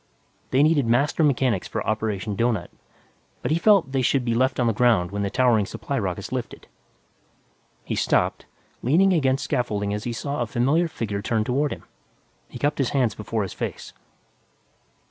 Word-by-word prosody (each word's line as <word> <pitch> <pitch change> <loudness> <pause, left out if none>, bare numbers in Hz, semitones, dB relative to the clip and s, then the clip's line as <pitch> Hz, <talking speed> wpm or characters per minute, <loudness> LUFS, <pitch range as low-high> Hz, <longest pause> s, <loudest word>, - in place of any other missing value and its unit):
They 135 +2 +3
needed 150 -5 +3
master 140 +7 +2
mechanics 130 -8 +1
for - - -4
Operation 110 -1 -2
Doughnut, 110 -5 -1 0.7
but - - -1
he 160 - +2
felt 195 -8 +4
they 135 -1 +1
should 130 0 +1
be 115 - +1
left 130 +2 +1
on 120 - +2
the 115 - +2
ground 105 -6 +2
when 100 0 -3
the 100 - -1
towering 110 -2 +2
supply - - -4
rockets - - -4
lifted. - - -5 1.2
He - - -4
stopped, - - 0 0.3
leaning 185 +10 +3
against 135 -5 +1
scaffolding 105 -5 -1
as 105 0 -4
he 120 - -2
saw 140 +3 -3
a 120 - -1
familiar 135 +10 +1
figure 105 -9 -4
turn 110 +1 0
toward 140 +6 0
him. - - -7 0.7
He - - -8
cupped 145 +1 -1
his 135 - +1
hands 125 -6 +1
before 110 +1 -3
his 95 - -6
face. - - -6
120 Hz, 175 wpm, -24 LUFS, 110-140 Hz, 1.2 s, felt